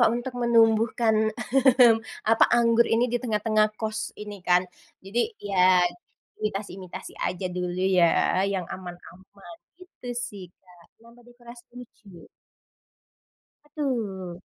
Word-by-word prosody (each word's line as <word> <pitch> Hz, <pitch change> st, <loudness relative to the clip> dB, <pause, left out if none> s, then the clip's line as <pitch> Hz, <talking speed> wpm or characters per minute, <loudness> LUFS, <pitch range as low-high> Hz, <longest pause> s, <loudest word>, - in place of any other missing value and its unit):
Pak 240 Hz, -, +6 dB
untuk 245 Hz, +2 st, -5 dB
menumbuhkan, 225 Hz, -1 st, +3 dB, 0.2 s
mmm, 250 Hz, -1 st, +4 dB, 0.3 s
apa? 225 Hz, +1 st, +4 dB
Anggur 235 Hz, 0 st, +3 dB
ini 230 Hz, +2 st, +2 dB
di 245 Hz, -, 0 dB
tengah-tengah 215 Hz, -2 st, +1 dB
kos 220 Hz, -1 st, -5 dB
ini 205 Hz, -2 st, -9 dB
kan. 180 Hz, 0 st, +2 dB, 0.4 s
Jadi 215 Hz, +5 st, -1 dB, 0.3 s
ya, 185 Hz, -2 st, +4 dB, 0.6 s
imitasi-imitasi 195 Hz, -3 st, -6 dB
aja 185 Hz, +1 st, -3 dB
dulu 180 Hz, 0 st, -3 dB, 0.2 s
ya 170 Hz, -, +6 dB, 0.5 s
yang 190 Hz, -2 st, -2 dB
aman-aman 185 Hz, -, -12 dB, 0.2 s
gitu 365 Hz, -9 st, -13 dB, 0.2 s
sih 200 Hz, -4 st, -10 dB
Kak 180 Hz, -2 st, -22 dB, 0.2 s
nambah 235 Hz, +1 st, -18 dB
dekorasi 240 Hz, 0 st, -15 dB
lucu. 210 Hz, -7 st, -14 dB, 1.4 s
Betul. 215 Hz, -, -4 dB
215 Hz, 110 wpm, -25 LUFS, 185-240 Hz, 1.4 s, Pak